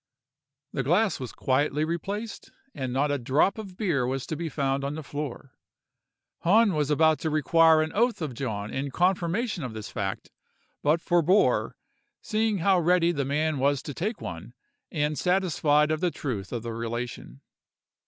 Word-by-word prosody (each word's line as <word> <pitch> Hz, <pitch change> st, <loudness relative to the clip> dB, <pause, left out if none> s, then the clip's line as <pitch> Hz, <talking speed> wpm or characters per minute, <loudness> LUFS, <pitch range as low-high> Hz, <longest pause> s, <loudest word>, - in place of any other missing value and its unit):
The -, -, -1 dB
glass 180 Hz, -, +2 dB
was 130 Hz, -2 st, -5 dB
quietly 145 Hz, +3 st, 0 dB
replaced, 200 Hz, +7 st, -4 dB, 0.2 s
and 130 Hz, -2 st, -4 dB
not 140 Hz, +3 st, +1 dB
a 145 Hz, -, 0 dB
drop 135 Hz, -, +2 dB
of 195 Hz, -4 st, -9 dB
beer 160 Hz, -, 0 dB
was 130 Hz, 0 st, -2 dB
to 155 Hz, -, -4 dB
be 165 Hz, +1 st, -4 dB
found 140 Hz, -2 st, -1 dB
on 140 Hz, +2 st, -3 dB
the 155 Hz, -, -6 dB
floor. 145 Hz, -2 st, -6 dB, 0.9 s
Hahn 205 Hz, +3 st, +4 dB
was 150 Hz, -2 st, 0 dB
about 155 Hz, +1 st, +3 dB
to 160 Hz, -, -1 dB
require 160 Hz, +1 st, +4 dB
an 155 Hz, -, -4 dB
oath 235 Hz, +3 st, +2 dB
of 155 Hz, -6 st, -4 dB
John 110 Hz, -5 st, -4 dB
in 140 Hz, +1 st, -2 dB
confirmation 180 Hz, -, 0 dB
of 120 Hz, -3 st, -5 dB
this 110 Hz, -1 st, -7 dB
fact; 95 Hz, -2 st, -4 dB, 0.5 s
but 155 Hz, +3 st, +2 dB
forbore, 175 Hz, +4 st, +2 dB, 0.4 s
seeing 215 Hz, -1 st, 0 dB
how 185 Hz, +1 st, +3 dB
ready 175 Hz, 0 st, +3 dB
the 140 Hz, -5 st, -2 dB
man 150 Hz, +1 st, 0 dB
was 140 Hz, 0 st, +1 dB
to 145 Hz, -, -6 dB
take 210 Hz, -, -3 dB
one, 90 Hz, +8 st, -8 dB, 0.4 s
and 150 Hz, -1 st, -1 dB
satisfied 155 Hz, -5 st, +2 dB
of 155 Hz, -, 0 dB
the 180 Hz, -, +1 dB
truth 115 Hz, -, -5 dB
of 120 Hz, -2 st, -4 dB
the 115 Hz, -1 st, -4 dB
relation. 115 Hz, -, -5 dB
150 Hz, 170 wpm, -27 LUFS, 135-175 Hz, 0.9 s, Hahn